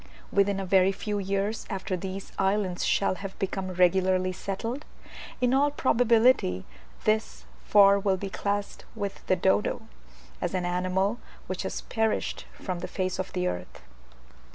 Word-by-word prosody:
Within 200 0 +2
a 195 - -3
very 190 0 +4
few 205 +1 -3
years 200 +3 -2
after 190 -2 -2
these 190 +2 -6
islands 195 -2 +1
shall 195 - +2
have 195 -1 -6
become 195 -1 -2
regularly 185 +1 +3
settled, 225 +9 -4 0.6
in 250 0 +2
all 280 +2 +4
probability 235 - +3 0.4
this 215 +1 0 0.2
for 200 -1 +6
will 195 -1 +1
be 195 +1 -5
classed 205 +1 -2
with 200 -3 -4
the 185 - +4
dodo, 190 +5 +1 0.6
as 175 +1 -1
an 180 -1 -1
animal 185 +5 0 0.3
which - - -4
has - - -4
perished 225 -2 -1
from 185 -3 -5
the 180 - -4
face 185 -1 -2
of 185 - -3
the 180 -1 -1
earth. 90 - -5
195 Hz, 150 wpm, -27 LUFS, 185-210 Hz, 0.6 s, for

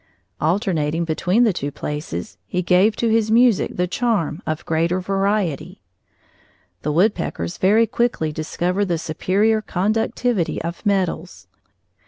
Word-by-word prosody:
Alternating 165 -2 0
between 175 +7 +1
the 220 -5 +3
two 145 -4 -3
places, 105 - -5
he 180 0 -2
gave 185 +5 +4
to 235 - 0
his 220 -1 +2
music 235 -1 +3
the 180 - +2
charm 195 -5 -1
of 155 +2 -3
greater 170 +2 +1
variety. 195 -3 -1 1.0
The 150 - -1
woodpeckers 160 - 0
very 215 +5 +4
quickly 225 -8 0
discover 175 +5 -1
the 175 -4 0
superior 200 +8 +1
conductivity 215 -1 0
of 170 +1 -5
metals. 185 -3 -1
180 Hz, 125 wpm, -21 LUFS, 160-215 Hz, 1.0 s, gave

